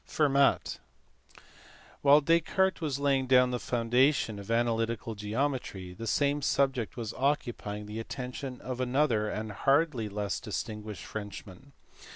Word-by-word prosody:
Fennat. 140 -2 +2 1.2
While 145 +1 +6
Descartes 170 +4 +2
was 145 -4 -1
laying 140 -2 +1
the 125 -1 +4
foundations 120 -1 +1
of 100 - -10
analytical 115 -1 0
geometry, 105 -3 -3
the 115 +5 -7
same 145 +4 +1
subject 130 -8 0
was 115 -2 -4
occupying 120 -7 -2
the 105 +2 -6
attention 125 +2 -6
of 130 0 -4
another 125 -4 +1
and 110 0 -4
hardly 135 -1 +1
less 100 0 -2
distinguished 105 -1 -5
Frenchman. 105 +4 -8
125 Hz, 120 wpm, -30 LUFS, 110-140 Hz, 1.2 s, While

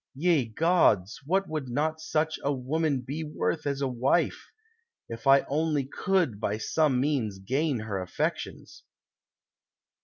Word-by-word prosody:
Ye 160 -2 +2
gods, 115 - +2
what 190 +3 +1
would 155 -5 -4
not 155 +5 -1
such 155 0 -1
a 140 - +1
woman 140 +1 0
be 140 +6 -5
worth 155 0 -2
as 140 0 -1
a 135 - +1
wife 130 +6 0
I 455 - -17
If 115 +3 -7
I 135 0 +7
only 150 0 0
could 165 - 0
by 105 -1 -1
some 140 +3 +1
means 130 -8 0
gain 130 +6 -1
her 100 -3 -3
affections." 90 - -4
145 Hz, 145 wpm, -28 LUFS, 125-160 Hz, -, I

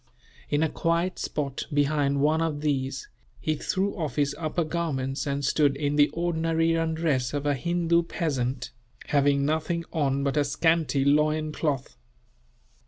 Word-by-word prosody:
In 145 +2 +2
a - - +3
quiet 170 +4 0
spot, 140 -3 -3
behind 145 -1 +1
one 155 +2 +3
of 155 -3 -1
these, 135 -3 -1 0.3
he 155 - 0
threw 190 +6 -1
off 160 -7 -3
his 145 -1 +1
upper 165 +1 -1
garments 150 -4 -2
and 140 0 -1
stood 140 0 +3
in 145 0 -1
the 145 0 +5
ordinary 165 -1 0
undress 160 -5 0
of 145 0 -2
a 145 - +3
Hindoo 170 +4 +1
peasant, 130 -5 -2 0.4
having 140 -1 +3
nothing 160 +3 -1
on 140 -4 +1
but 140 +1 0
a 145 - +4
scanty 150 -1 +1
loincloth. 150 -1 +1
150 Hz, 145 wpm, -26 LUFS, 140-165 Hz, 0.4 s, the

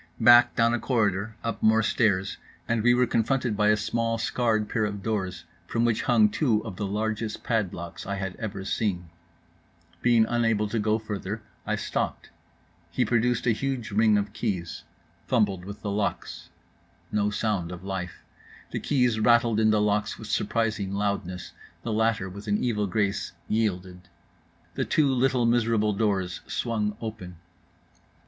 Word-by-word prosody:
Back, 120 +1 +7
down 115 0 +3
a 120 - 0
corridor, 105 -4 0
up 115 -2 -3
more 110 +1 +4
stairs; 100 -4 +1 0.3
and 115 -1 +1
we 120 +2 +4
were 125 0 +4
confronted 120 0 0
by 105 0 +2
a 105 0 +4
small 115 +2 -1
scarred 110 -2 0
pair 110 0 -1
of 100 -2 -3
doors 95 -6 -3 0.2
from 115 +4 0
which 115 -2 +1
hung 215 - +4
two 120 - +1
of 110 -5 -6
the 100 +2 -3
largest 110 +2 -2
padlocks 90 -8 -3
I 100 - -2
had 95 -2 -4
ever 100 -4 -5
seen. 90 -5 -2 0.9
Being 115 -2 +4
unable 115 -3 +1
to 115 +2 -1
go 110 +1 +2
further, 105 0 -5 0.2
I 105 - +1
stopped: 110 - -3 0.6
he - - 0
produced 120 0 +1
a 120 - +4
huge 125 -1 -2
ring 110 0 +4
of 105 0 -2
keys. 95 -8 -3 0.4
Fumbled 100 -7 +1
with 100 +2 -9
the 100 - -2
locks. 100 0 -3 0.6
No 105 0 +1
sound 105 -5 -1
of 90 0 -8
life: 95 -2 -5 0.5
the - - -2
keys 125 -6 +1
rattled 115 0 +4
in 110 0 +4
the 110 0 +3
locks 105 0 0
with 110 - -9
surprising 105 -3 -1
loudness; 100 -3 -2 0.3
the 115 - -2
latter, 110 -3 +1
with 100 +3 -9
an 105 0 +2
evil 105 -4 0
grace, 100 +1 -1
yielded—the 90 -5 -4
two 145 -3 +2
little 130 -1 +2
miserable 115 -3 +2
doors 100 -4 -1
swung 105 -3 -2
open. 110 -6 -6
110 Hz, 155 wpm, -26 LUFS, 100-115 Hz, 0.9 s, Back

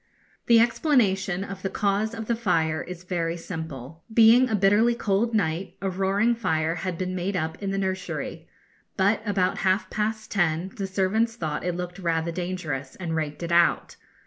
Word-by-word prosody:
The 235 -1 +7
explanation 205 - +2
of 195 -1 -7
the 195 - -2
cause 210 +3 0
of 225 -1 -5
the 235 - 0
fire 165 -8 +1
is 180 0 -8
very 170 -2 -2
simple. 160 -3 -7
Being 230 +3 +6
a 220 - +1
bitterly 205 +4 +4
cold 225 +1 0
night, 175 -2 -1
a 195 -1 -2
roaring 195 +5 +2
fire 160 -8 0
had 180 0 -4
been 185 +1 -3
made 185 +2 -2
up 160 +1 -3
in 200 - -2
the 195 - -1
nursery, 190 -1 -3 0.5
but 200 +3 +2
about 190 -3 +1
half 185 0 +1
past 215 +1 -2
ten 175 -2 +1
the 195 - -3
servants 205 +4 +1
thought 155 -9 -3
it 180 -1 -1
looked 180 +1 -5
rather 165 -2 0
dangerous 165 -7 -4
and 170 -3 -4
raked 155 0 -3
it 170 - -3
out. 170 0 +3
190 Hz, 175 wpm, -25 LUFS, 170-210 Hz, 0.5 s, The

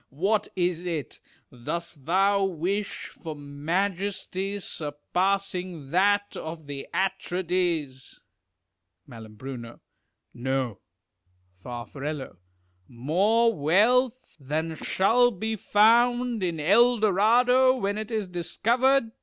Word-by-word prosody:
What 200 +9 0
is 175 -1 0
it? 155 -8 -4 0.3
Dost 145 +4 -6
thou 195 +3 +3
wish 195 +3 -2
for 160 -2 -8
majesty 185 +6 -2
surpassing 180 0 -2
that 205 +3 +2
of 160 -1 -7
the 140 -1 -7
Atrides? 175 -7 -2 0.9
Mai 115 -2 -11 1.1
No. 125 -4 -2 0.8
Far. 120 +2 -6 1.0
More 195 - +2
wealth 230 - +2
than 155 +4 -2
shall 230 +9 +3
be 220 +1 -3
found 235 +3 +3
in 170 -3 -2
El 235 +10 +4
Dorado, 240 +6 +4
when 205 -4 -2
it 215 - -5
is 215 -4 -2
discovered 230 +8 +1
190 Hz, 90 wpm, -26 LUFS, 155-215 Hz, 1.1 s, El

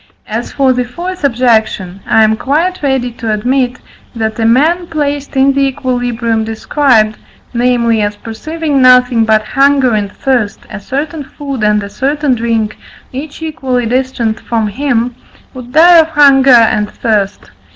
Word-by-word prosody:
As 225 +3 -4
for 270 -2 +2
the 250 0 -1
fourth 350 +8 -7
objection, 225 -7 0
I 220 - +4
am 220 0 +3
quite 320 +10 -1
ready 265 -4 -1
to 230 -1 -4
admit, 250 +3 0 0.4
that 220 -1 -3
a 225 - +1
man 320 +9 +2
placed 290 -3 -3
in 270 +1 +4
the 275 0 +1
equilibrium 245 -3 -2
described 225 -1 +1 0.3
(namely, 235 -2 +1
as 205 0 -1
perceiving 285 +7 -3
nothing 250 -2 +4
but 215 -1 +2
hunger 275 -2 +3
and 205 -2 -1
thirst, 245 -6 -1
a 210 - -6
certain 285 +7 -4
food 275 -2 -7
and 210 -1 +2
a 200 - -7
certain 280 +5 0
drink, 225 -2 -2 0.3
each 290 +4 -7
equally 255 -6 -2
distant 240 -2 -1
from 230 -2 -2
him) 245 0 -1 0.4
would 250 -2 -10
die 335 +4 +6
of 320 - +3
hunger 280 -3 +4
and 220 -4 +4
thirst. 205 -3 -2
250 Hz, 150 wpm, -12 LUFS, 225-280 Hz, 0.4 s, die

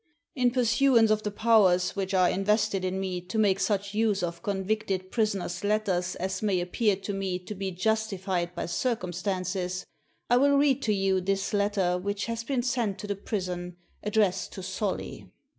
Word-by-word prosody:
In 250 -4 +2
pursuance 240 -1 +4
of 215 0 +2
the 210 - -2
powers 205 -4 +3
which 195 -1 -2
are 185 -1 +5
invested 200 +1 +1
in 185 +1 -1
me 185 -2 -3
to 220 - -3
make 200 -3 +3
such 200 -1 0
use 210 -3 +1
of 170 -1 -3
convicted 195 -2 -2
prisoners' 200 -5 -1
letters 200 -4 0
as 190 +1 -3
may 200 -4 +1
appear 200 +4 +1
to 200 +1 -5
me 195 -2 -2
to 180 +3 -8
be 195 -1 -3
justified 190 -3 -1
by 170 - -3
circumstances, 185 -2 -2 0.4
I 245 - +4
will 280 +2 +4
read 280 -1 +3
to 220 - 0
you 195 -1 +1
this 195 +3 -1
letter 200 -3 +1
which 200 +2 -2
has 230 0 -3
been 250 0 -1
sent 235 -5 0
to 210 - -7
the 205 -1 -2
prison, 180 -4 -4 0.2
addressed 210 -3 +1
to 190 - -7
Solly." 190 +2 -4
200 Hz, 175 wpm, -28 LUFS, 185-220 Hz, 0.4 s, are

